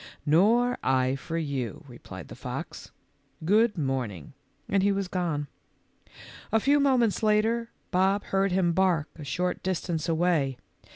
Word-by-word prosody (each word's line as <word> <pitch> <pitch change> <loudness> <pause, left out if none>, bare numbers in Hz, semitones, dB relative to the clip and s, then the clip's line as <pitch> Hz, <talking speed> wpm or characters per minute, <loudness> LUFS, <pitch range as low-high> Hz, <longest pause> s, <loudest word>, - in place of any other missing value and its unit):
"Nor 225 +11 +3
I 130 0 +2
for 165 +4 -5
you," 140 -8 -3
replied - - -10
the - - -8
fox. - - -7 0.6
"Good 210 +3 +3
morning," 130 - -3 0.3
and 195 0 +2
he 200 +1 +3
was 195 -1 -1
or>ne. 165 -5 -1 1.1
A 225 - +4
few 285 +5 +3
moments 255 -6 +2
later, 220 +2 +2 0.2
Bob 195 +2 +2
heard 195 0 0
him 180 -2 +2
bark 175 -4 +2
a 155 - -9
short 180 +7 -2
distance 175 -3 -2
away. 160 -6 +1
180 Hz, 135 wpm, -27 LUFS, 150-210 Hz, 1.1 s, A